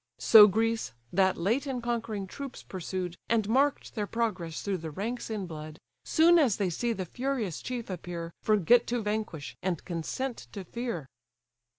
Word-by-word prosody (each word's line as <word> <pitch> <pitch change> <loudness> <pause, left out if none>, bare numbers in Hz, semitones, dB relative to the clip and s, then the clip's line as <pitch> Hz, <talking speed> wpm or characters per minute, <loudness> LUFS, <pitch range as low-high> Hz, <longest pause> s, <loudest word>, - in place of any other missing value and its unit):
So 215 -2 +9
Greece, 225 - 0 0.2
that 190 0 +3
late 230 +11 0
in 260 -2 -2
conquering 230 -4 -2
troops 270 +7 -8
pursued, 180 -1 -4
And 225 -3 +2
mark'd 270 +5 +1
their 210 -2 -2
progress 190 -9 -2
through 195 -2 -1
the 160 0 -5
ranks 225 +11 -4
in 210 -3 -3
blood, 155 -2 -8 0.3
Soon 340 +2 +5
as 255 -10 +3
they 195 -4 0
see 235 +8 -1
the 195 -5 -3
furious 245 - -2
chief 245 -2 -4
appear, 170 -2 -5
Forget 215 +3 +4
to 240 -1 -1
vanquish, 210 -8 -3
and 180 -4 -2
consent 210 +9 -4
to 200 - -5
fear. 235 - -4
210 Hz, 165 wpm, -29 LUFS, 180-240 Hz, 0.3 s, So